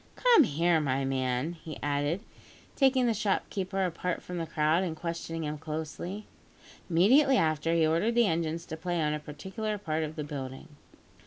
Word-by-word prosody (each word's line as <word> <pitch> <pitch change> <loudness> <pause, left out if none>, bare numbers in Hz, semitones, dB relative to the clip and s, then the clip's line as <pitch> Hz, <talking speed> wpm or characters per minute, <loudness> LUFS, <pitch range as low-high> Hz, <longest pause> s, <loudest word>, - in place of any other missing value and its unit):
"Come 475 - +6
here, 165 +1 +2
my 135 -2 0
man," 130 +3 -1
he 160 -2 -9
added, 145 +5 0 0.5
taking 265 -2 +4
the 235 - +3
shopkeeper 195 -2 -1
apart 180 0 -3
from 180 -1 -5
the 165 - -3
crowd, 155 +3 +2
and 170 -4 -3
questioning 165 0 -4
him 150 0 -4
closely. 160 +6 -5 0.6
Immediately 255 - +5
after, 160 -1 +1
he 165 -1 +4
ordered 170 +9 +1
the 240 -1 +5
engines 165 -2 -1
to 160 - -6
play 175 +1 -2
on 150 -1 +1
a 150 - -2
particular 190 +9 -5
part 160 -5 -2
of 155 0 -5
the 155 - -3
building. 135 -3 -7
165 Hz, 170 wpm, -29 LUFS, 150-190 Hz, 0.6 s, Come